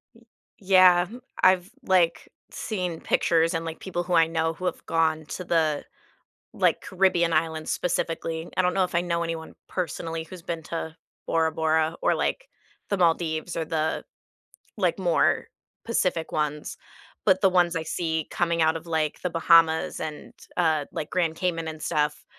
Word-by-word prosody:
M 230 - -20 0.4
Yeah. 185 -2 +6
Hmm 230 +6 -10 0.3
I've, 185 0 +4
like, 180 -5 +2 0.2
seen 180 -7 -4
pictures 165 0 +2
and, 165 0 -2
like, 165 0 -6
people 180 -2 -3
who 175 +1 -3
I 165 -1 +6
know 160 0 -1
who 185 - -7
have 180 - -2
gone 160 -1 +1
to 180 - -5
the, 160 -4 +1 0.7
like, - - +1
Caribbean 180 -3 +2
islands 160 0 0
specifically. 165 -1 -2
I 185 - +5
don't 180 - +1
know 190 - +3
if 180 - -6
I 170 - +3
know 170 -1 -1
anyone 165 -1 -5 0.2
personally 165 -2 -3
who's 175 +1 -11
been 165 -1 -4
to 160 0 -5 0.3
Bora 160 -1 +2
Bora 160 0 +1
or, - - +3
like, - - -1 0.4
the 200 - 0
Maldives 165 -1 +1
or 165 - -1
the, 160 0 -1 0.7
like, - - 0
more - - +2 0.4
Pacific 185 -7 -1
ones, 150 -1 -2 0.5
but 190 -2 +4
the 190 -1 +4
ones 180 -1 +3
I 165 - -2
see 160 -1 -2
coming 170 -1 0
out 160 0 +3
of, 165 0 -6
like, 160 -2 -1
The 180 - -1
Bahamas 165 -1 +3
and, 155 -1 -6 0.2
uh, 160 -4 +2
like, 160 -2 -5
Grand 170 -3 0
Cayman 165 -2 -2
and 155 -1 -8
stuff, 150 -2 -1
165 Hz, 170 wpm, -26 LUFS, 160-180 Hz, 0.7 s, Yeah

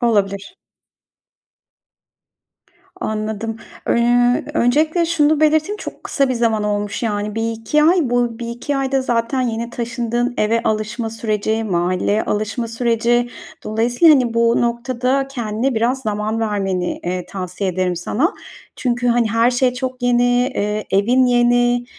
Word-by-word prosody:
Olabilir. 205 - 0 2.4
Anladım. 220 +1 -3 0.3
Iıı, 245 +1 +3
öncelikle 310 +8 +2
şunu 310 -2 +2
belirteyim, 310 +6 +2
çok - - -9
kısa 275 -2 +1
bir 255 - 0
zaman 225 -3 +1
olmuş, 205 +1 -2
yani. 210 -1 -2
1-2 225 +6 0
ay. 350 +4 +5
Bu 240 -1 0
1-2 240 +4 -4
ayda 270 0 0
zaten 235 +1 0
yeni 235 -1 -2
taşındığın 240 +1 -2
eve 230 +2 +1
alışma 220 +1 -2
süreci, 220 0 -1
mahalleye 185 +3 0
alışma 215 +3 -2
süreci. 235 +1 +1 0.4
Dolayısıyla, 240 +9 +4
hani, 245 -4 +1
bu 230 0 +3
noktada 250 +3 0
kendine 240 0 -2
biraz 240 +4 0
zaman 215 +1 -2
vermeni, 195 -4 -1
eee, 180 0 -3
tavsiye 185 0 -4
ederim 180 0 -1
sana. 265 - 0 0.4
Çünkü, 245 -1 -1
hani, 235 -2 +2
her 230 +2 +3
şey 250 0 +1
çok 255 -1 -5
yeni, 245 0 +3 0.3
eee, 210 -4 -2
evin 240 +7 +3
yeni. 245 0 +3
235 Hz, 130 wpm, -19 LUFS, 215-250 Hz, 2.4 s, ay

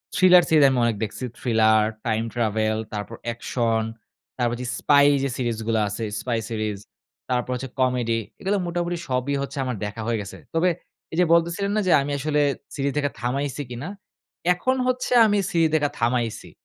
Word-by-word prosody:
thriller 180 -1 +7
series 155 -3 +5
আমি 130 - 0
অনেক 115 -2 +1
দেখছি। 110 +4 -5 0.2
Thriller, 110 -3 +4 0.2
time 110 +1 0
travel, 110 -2 0 0.2
তারপর 105 +2 -5 0.2
action, 115 -1 0 0.6
তারপর 120 -1 0
যে - - -4
spy 145 -1 +5 0.2
যে 140 - 0
সিরিজগুলো 115 -2 -1
আছে, 105 +3 -4 0.2
spy 120 -2 -1
series, 110 -2 -2 0.5
তারপর 125 0 0
হচ্ছে 135 +1 -5
comedy 125 -3 +1 0.2
এগুলো 200 +2 0
মোটামুটি 175 0 -2
সবই 130 +2 0
হচ্ছে 140 - -5
আমার 125 -2 -2
দেখা 105 +2 -5
হয়ে 115 - +1
গেছে। 100 - -8 0.2
তবে 165 +3 +3 0.4
এইযে 175 +2 +3
বলতেছিলেন 170 +4 +1
না 215 - +2
যে 180 - +4
আমি 145 +1 -3
আসলে 150 +1 +1 0.3
সিরিজ 140 -1 0
দেখা 145 -1 0
থামাইছি 135 +3 -2
কিনা? 125 +9 -5 0.6
এখন 255 +9 0
হচ্ছে 255 0 -1
আমি 210 -1 +2
সিরিজ 165 -1 +3
দেখা 145 -2 +2
থামাইছি। 120 -1 -1
125 Hz, 165 wpm, -24 LUFS, 115-160 Hz, 0.6 s, thriller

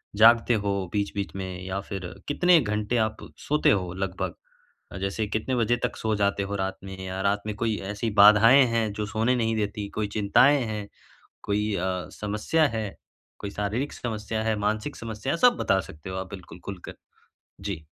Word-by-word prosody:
जागते 115 +2 +6
हो 100 - 0 0.2
बीच-बीच 100 -1 -2
में 95 -1 -5
या 95 +1 -2
फिर 95 -3 -5 0.2
कितने 175 +3 +5
घंटे 105 +2 -1
आप 110 0 -5 0.3
सोते 150 +1 +3
हो 90 -3 0
लगभग? 95 0 -3 0.7
जैसे 100 +3 -1
कितने 110 +5 -1
बजे 120 0 +2
तक - - -1
सो 110 -1 0
जाते 100 -1 +1
हो 100 +1 -4
रात 95 -1 -2
में 95 -1 -8
या 95 +1 -4
रात 100 +1 +1
में 105 - -3
कोई 110 0 -1
ऐसी 105 +2 -2
बाधाएँ 110 +6 +8
हैं 110 -2 +1
जो 105 0 -3
सोने 110 +4 +1
नहीं 115 -2 0
देती, 105 -1 -2
कोई 105 +1 -2
चिंताएँ 110 +8 +4
हैं, 105 -2 -4 0.6
कोई 105 +1 0
अ, 90 0 -2
समस्या 105 +10 +1
है, 105 -3 -4 0.4
कोई 100 - -5
शारीरिक 105 +8 -2
समस्या 110 -1 -3
है, 110 -1 +1
मानसिक 110 +7 -1
समस्या 115 +6 -3
सब 245 -1 +5
बता 95 - +2
सकते 80 +4 -10
हो 95 - -4
आप 95 0 -5
बिल्कुल 90 -2 -10
ख़ुलकर, 95 -3 -7 0.7
जी। 95 -6 -5
105 Hz, 175 wpm, -26 LUFS, 100-110 Hz, 0.7 s, बाधाएँ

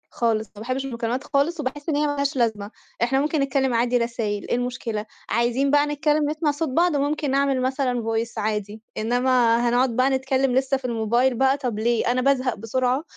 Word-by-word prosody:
خالص، 220 -2 0
ما - - -11
باحبّش 255 +4 -3
المكالمات 240 0 -3
خالص 300 +4 0
وباحس 290 +2 -4
إن 305 - +1
هي 300 +1 +1
ما 290 - -1
لهاش 280 0 -1
لازمة، 220 -4 -1 0.3
إحنا 265 +3 +2
ممكن 300 +1 0
نتكلّم 270 -2 +1
عادي 240 +1 +2
رسايل 230 -3 -2
إيه - - +2
المشكلة، 245 -3 -3 0.2
عايزين 240 +4 +1
بقى 290 0 +4
نتكلّم 295 0 +1
نسمع 305 0 0
صوت 300 +1 -3
بعض 335 +4 +2
وممكن 290 0 0
نعمل 275 -1 +1
مثلًا 255 -1 0
voice 225 +1 -2
عادي، 210 0 -3 0.2
إنّما 245 +1 +2
هنقعُد 245 0 +2
بقى 255 +2 +3
نتكلّم 265 0 +1
لسّه 265 +1 +2
في 265 - -11
الموبايل 235 +2 +1
بقى 265 +3 +2
طب 245 -6 -3
ليه؟ 235 +1 +1
أنا 255 +1 +1
بازهق 260 -2 +1
بسرعة، 250 +5 -1
255 Hz, 190 wpm, -23 LUFS, 235-275 Hz, 0.3 s, بقى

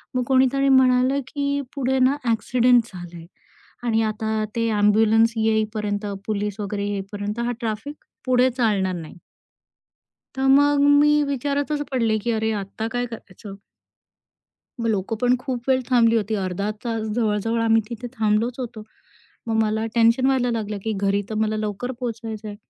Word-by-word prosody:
मग 250 - +1
कोणीतरी 265 +1 +3
म्हणालं, 260 0 +4
की 280 0 -2
"पुढे 265 -1 0
ना 260 +3 +3
ॲक्सिडेंट 240 +1 +3
झालंय 175 -2 -9 0.6
आणि 225 -2 +1
आता 220 0 -1
ते 230 0 +1
ॲम्ब्युलन्स 220 +2 +3
येईपर्यंत 215 -1 0 0.2
पोलीस 210 -1 -2
वगैरे 205 0 -3
येईपर्यंत 205 +2 -4
हा 235 - -1
सगळं 245 - -1
ट्रॅफिक 230 +6 -4 0.3
पुढे 255 0 +3
चालणार 200 -6 +1
नाही." 160 -2 -8 1.2
तर 265 - -4
मग 285 +1 +4 0.2
मी 295 0 +5
विचारतच 285 +2 -1
पडले, 230 -4 +1
की 235 - 0
"अरे! 220 0 0
आता 220 +3 -5
काय 245 - 0
करायचं?" 200 -2 -10 1.3
मग 230 - -1
लोक 205 0 -1
पण 245 0 +4
खूप 250 -3 -4
वेळ 260 -1 +3
थांबली 230 -2 +4
होती, 215 0 0
अर्धा 195 +1 -2
तास 230 -2 -2
जवळ-जवळ 225 0 0
आम्ही 225 0 +3
तिथे 240 +1 -6
थांबलोच 225 +2 0
होतो. 235 -3 -6 0.6
मग 225 - 0
मला 220 +1 -1
टेन्शन 230 +3 +4
व्हायला 260 -2 +2
लागलं 215 -2 -3
की 225 - -1
घरी 200 0 +1
तर - - -4
मला 215 0 0
लवकर 215 +4 -3
पोहोचायचं 225 -3 -5
आहे. 205 - -6
225 Hz, 155 wpm, -23 LUFS, 210-250 Hz, 1.3 s, मी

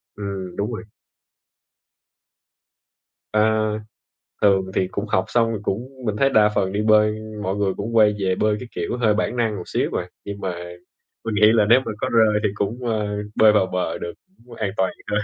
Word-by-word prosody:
Ừm, 100 -3 -5
đúng 105 +4 -2
rồi. 110 - -5 2.5
À, 110 - +2 1.0
thường 95 -2 +3
thì 95 - +1
cũng 100 +2 -4
học 95 -2 +1
xong, 115 -1 +2
mình 105 - -5
cũng 115 +5 -3 0.2
mình 105 -2 -1
thấy 135 +5 +3
đa 105 -4 +5
phần 95 -2 0
đi 105 - 0
bơi 105 0 +4 0.3
mọi 95 0 -2
người 100 -2 0
cũng 115 +3 -3
quay 105 -2 +5
về 95 -2 +1
bơi 105 +1 +1
cái 125 - -8
kiểu - - -2
hơi 110 -3 +3
bản 115 +3 -1
năng 115 -3 0
một 90 - -5
xíu - - 0
à, - - -7 0.2
nhưng 100 0 -6
mà 95 -3 -3 0.7
mình 110 -2 -2
nghĩ 105 +2 +6
là 110 -2 +4
nếu 120 +3 +6
mà 130 - -5
có - - 0
rơi 110 -2 +4
thì - - +2
cũng, 100 +3 -2
ờ, 110 -2 0 0.3
bơi 110 -1 +6
vào 105 -3 +3
bờ 90 0 -2
được, 85 - -5 0.3
cũng 120 - -12
an 105 -3 -2
toàn 95 -1 +1 0.2
hơn. 105 - +1
105 Hz, 200 wpm, -22 LUFS, 100-110 Hz, 2.5 s, nghĩ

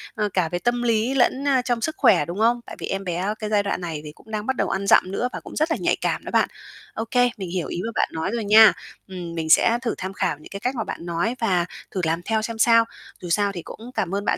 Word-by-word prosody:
ờ, 210 -2 0
cả 180 -4 +1
về 175 +1 -2
tâm 240 +4 0
lý 230 +2 +1
lẫn, 270 +1 +2
a, 265 -2 +3
trong 245 -2 -1
sức 315 +6 -2
khỏe, 200 - +4
đúng 175 +5 -6
không? 235 +2 +3
Tại - - -9
vì - - -4
em 195 0 -3
bé 185 +3 -2
cái 215 - -4
giai 210 -1 +2
đoạn 200 -2 -2
này 165 -4 -4
thì 150 - -8
cũng 220 +8 -18
đang 215 -1 -3
bắt 265 - 0
đầu - - 0
ăn 195 +1 -2
dặm 185 - +5
nữa 240 +5 -1
và - - -4
cũng - - -11
rất 310 +2 +1
là - - +1
nhạy - - +2
cảm - - -1
đó - - -6
bạn. - - +3 0.4
Ô 225 - -3
kê, 245 -1 +4
mình 190 -3 -5
hiểu 180 -1 -2
ý 175 - -4
mà 230 - -3
bạn - - +1
nói 160 +4 -2
rồi 235 -2 -1
nha. 215 +1 +8 0.3
Ừm, 175 -3 -7
mình 160 -1 -3
sẽ 230 +8 +5
thử 240 -3 -2
tham 190 +1 -5
khảo 195 - -1
những 155 - -13
cái 200 - -6
cách 250 +6 -2
mà 225 - -1
bạn 170 - -7
nói 175 +8 -1
và 185 -6 +2 0.3
thử 185 - -2
làm 165 +1 0
theo 220 -1 +1
xem 225 +1 -4
sao. 230 0 +5 0.4
Dù 175 - -7
sao 205 +3 +2
thì 180 -3 -6
cũng 230 +8 -10
cảm 195 -5 -1
ơn 200 +1 -2
bạn - - +1
210 Hz, 295 wpm, -23 LUFS, 180-230 Hz, 0.4 s, nha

